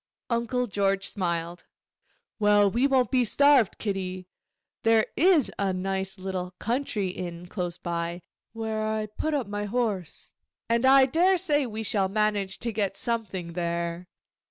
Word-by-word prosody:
Uncle 235 +2 0
George 195 -3 0
smiled. 170 -2 -3 0.7
'Well, 205 -1 +4
we 245 +6 +2
won't 260 -2 +2
be 255 -2 +3
starved, 270 -1 +4
Kitty; 185 -3 -4 0.6
there 225 -1 +4
is 335 -5 +4
a 195 -2 +1
nice 190 +1 -2
little 185 -1 -5
country 230 -5 -1
inn 175 -1 -6
close 180 -2 -4
by, 170 0 -4 0.3
where 220 -1 -3
I 215 0 -1
put 295 +9 -3
up 270 -5 -1
my 205 +1 -4
horse, 205 -6 -3 0.3
and 235 +3 +2
I 270 0 +7
daresay 330 -1 +2
we 220 -1 -5
shall 200 -3 +1
manage 205 -2 0
to 235 - -2
get 205 -3 -1
something 200 -7 -3
there. 170 0 -3
205 Hz, 140 wpm, -26 LUFS, 185-235 Hz, 0.7 s, I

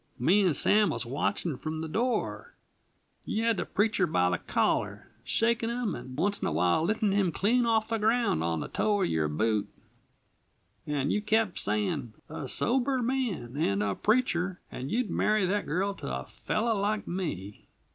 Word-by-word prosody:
"Me 185 - +4
and 180 -7 +2
Sam 210 -1 +4
was - - -2
watching 145 +4 -1
from 155 +3 -4
the 160 - -3
door. 240 +10 -2 0.7
You 220 - -2
had 230 -2 +2
the - - -2
preacher 205 -3 +1
by 90 - +2
the 90 - 0
collar, - - -1
shakin' 230 0 +1
him, 235 -5 -1
and 130 +2 -8
once 200 +6 0
in - - 0
awhile 90 - +2
liftin' 210 +3 +1
him 195 -3 +2
clean 235 +8 +2
off 220 -1 +2
the 225 -1 0
ground 220 - +2
on 85 -2 -1
the - - -4
toe 205 -2 +1
of - - +2
your 80 -1 +1
boot; 105 +7 0 1.2
and 145 -1 0
you 210 - 0
kept 215 -2 +1
saying: 105 +2 -1 0.2
'A 160 - -5
sober 260 +1 +1
man, 230 - -2
and 105 -9 +1
a 100 -1 0
preacher 190 - +1
and 130 +2 -5
you'd 240 +3 -1
marry 215 -2 +2
that 205 +3 -1
girl 190 +6 0
to 65 - -6
a 65 0 -4
fellow 225 +2 -1
like 210 +1 -1
me!' 105 - -5
190 Hz, 175 wpm, -29 LUFS, -, 1.2 s, Me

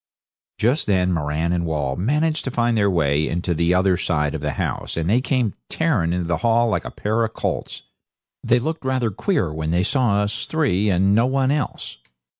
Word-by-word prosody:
Just 125 +8 +1
then 90 -2 +2
Moran 80 +2 -1
and 85 -1 0
Wall 75 -5 -2
managed 150 - 0
to - - -1
find 120 -2 +1
their 100 -2 +3
way 75 -4 +1
into 85 +1 -1
the 85 +2 +1
other 95 -1 +3
side 75 -5 -1
of 80 - -4
the 75 -1 -2
house, - - -3
and 80 0 -1
they 115 +7 +3
came 125 -6 0 0.2
tearing 125 - 0
into 90 -1 -2
the 85 -1 0
hall 115 +3 +2
like 105 - -1
a - - -4
pair 110 +2 -1
of 110 0 -3
colts. - - -4 0.6
They 120 - +3
looked 155 +6 -3
rather 130 -4 0
queer 95 - -1
when 80 0 -3
they 85 +2 +2
saw 105 -3 +1
us 105 0 -3
three 115 - +1
and 95 +1 +3
no 115 +4 +3
one 135 0 +1
else. 145 - -3
100 Hz, 205 wpm, -21 LUFS, 85-125 Hz, 0.6 s, their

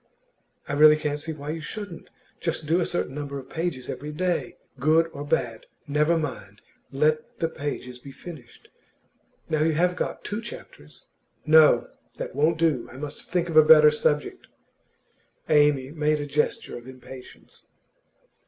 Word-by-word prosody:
'I 145 - -3
really 150 +1 +7
can't 150 -1 -2
see 160 +2 -5
why 150 -1 -6
you 160 0 -5
shouldn't. 200 +2 -8 0.3
Just 165 -2 -3
do 165 +4 +2
a - - 0
certain 175 - -2
number 140 -1 -5
of 135 0 -10
pages 160 -7 -3
every 150 +2 -6
day. 170 -4 -2 0.2
Good 155 +5 +4
or 145 - -6
bad, 120 -6 -2 0.2
never 150 +3 +2
mind; 105 -10 -6 0.3
let 155 +2 0
the 165 - 0
pages 140 -5 -6
be 135 +2 -11
finished. 140 -5 -12 0.8
Now 155 -2 0
you 160 +1 +2
have 180 +3 +2
got - - -4
two 210 +2 -4
chapters 75 - -11 0.2
' - - -42
'No; 155 0 +6 0.3
that - - -5
won't 155 +5 +2
do. 160 -7 +1
I - - -11
must 145 +1 -8
think 175 -1 0
of 165 - -5
a - - +11
better 150 -1 +8
subject.' 150 0 -1 1.0
Amy 145 -3 +3
made 150 -1 0
a 145 - -3
gesture 145 -3 -2
of 120 - -16
impatience. 130 0 -13
150 Hz, 160 wpm, -25 LUFS, 140-160 Hz, 1.0 s, a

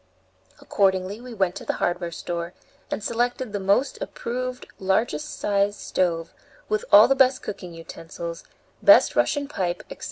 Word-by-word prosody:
Accordingly 195 +2 0
we 250 0 -10
went 190 -3 +1
to - - -8
the - - -1
hardware 175 -1 -2
store 170 +1 -5 0.3
and 215 - -3
selected 240 0 -1
the 205 - -1
most 200 +8 +1
approved, 255 +1 -4
largest 190 -5 -1
sized 200 0 +1
stove, 170 -3 -1 0.3
with 215 -1 -1
all 210 +2 +9
the 270 - +4
best 260 -1 +3
cooking 180 -4 -7
utensils, 165 0 -8 0.4
best - - +6
Russian 285 -1 +1
pipe, 180 -10 -3
etc. - - -9
195 Hz, 150 wpm, -24 LUFS, 175-240 Hz, 0.4 s, all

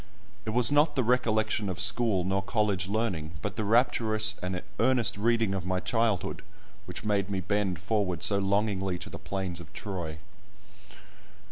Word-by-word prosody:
It - - +1
was 120 +4 +4
not 145 +1 +4
the 130 - +2
recollection 110 -3 +1
of 90 -1 -4
school 110 -2 +2
nor 95 +2 0
college 100 -3 0
learning, 95 -7 -2
but 105 -1 -3
the 110 - -2
rapturous 110 -1 +2
and 90 0 -2 0.2
earnest 125 -4 +3
reading 115 -1 +1
of 95 -2 -2
my 90 0 -1
childhood, 115 -2 0 0.5
which 90 - -6
made 100 -2 +1
me 95 -1 -1
bend 95 -1 0
forward 100 -2 -1
so 100 -1 +4
longingly 100 -2 0
to 85 - -9
the - - -7
plains 95 -3 -4
of 85 -2 -12
Troy. 85 -7 -5
100 Hz, 160 wpm, -29 LUFS, 95-110 Hz, 0.5 s, was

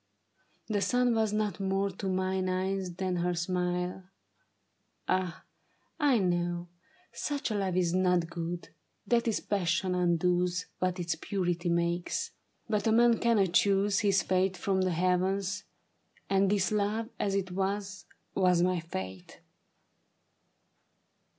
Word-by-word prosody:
The 205 -2 -1
sun 245 +2 +2
Was 220 -2 +1
not 210 -1 -1
more 195 0 0
to 190 +1 -5
mine 185 0 0
eyes 185 -1 -2
than 185 -1 -1
her 175 +1 0
smile. 180 +1 -2 1.0
Ah, 185 -2 -1 0.6
I 285 -5 +4
know 175 -2 0 0.4
Such 290 -4 -2
a - - 0
love 195 -3 -1
is 175 -2 +2
not 180 -2 +2
good 170 0 -5 0.2
— - - -47
that 235 0 +2
its 225 - +1
passion 180 -2 0
undoes 180 +1 +1
What 185 0 0
its 175 -1 -1
purity 175 -3 -2
makes. 170 +1 0 0.4
But 210 -1 0
a - - +4
man 235 +1 +5
cannot 205 -7 +2
choose 200 +1 +3
His 200 -2 +3
fate 185 0 +1
from 190 +1 0
the 185 -1 +1
heavens; 185 +3 0 0.6
and 195 0 +3
this 200 -1 +1
love, 215 +2 0
as 195 -1 0
it 190 -2 -1
was, 200 +2 -2 0.3
Was 180 -2 +3
my 180 -1 +2
fate. 95 - -7
185 Hz, 135 wpm, -30 LUFS, 180-200 Hz, 1.0 s, man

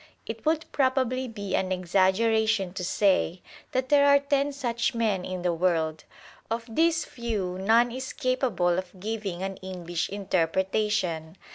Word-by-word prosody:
It 225 +5 -6
would 320 0 +2
probably 260 -1 +1
be 205 -4 -4
an 190 0 0
exaggeration 195 +2 +2
to 185 - -4
say 190 -1 +1 0.3
that 260 0 -1
there 285 -1 +5
are 280 0 +7
ten 280 0 0
such 240 -3 -1
men 215 -5 0
in 185 -1 -5
the 175 -1 +1
world. 165 -2 0 0.4
Of 230 +1 -2
these 320 +7 +2
few 210 -7 -3
or - - -7
none 230 +5 +4
is 260 +2 -5
capable 245 - +1
of 185 0 -9
giving 200 -3 -4
an 195 0 -4
English 175 -2 -4
interpretation. 190 -2 -1
205 Hz, 150 wpm, -27 LUFS, 185-250 Hz, 0.4 s, are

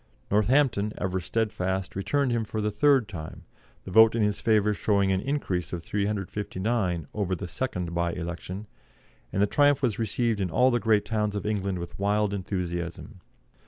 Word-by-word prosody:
Northampton, 105 0 +2
ever 95 -1 -1
steadfast, 95 -2 -2
returned 135 +7 0
him 115 -1 +1
for 110 0 -4
the 105 0 0
third 130 +2 +3
time 80 -7 -8 0.4
the 95 - -8
vote 110 +3 +7
in 115 - +2
his 105 -1 0
favour 105 -2 +3
showing 100 -2 +1
an 95 0 +1
increase 115 -12 -2
of 85 -2 -4
359 100 -2 -2
over 95 -3 -1
the 90 0 -6
second 90 -3 -3
bye 85 0 0
election 90 +4 -5 0.7
and 100 - +2
the - - +6
triumph 145 +5 +3
was 115 -4 +1
received 115 0 0
in 95 - 0
all 125 +10 +4
the 120 - +2
great 110 -2 +2
towns 105 -1 -1
of 100 - -3
England 100 -3 -1
with 85 +1 -7
wild 105 +1 +1
enthusiasm. 90 -1 -4
105 Hz, 170 wpm, -27 LUFS, 95-110 Hz, 0.7 s, vote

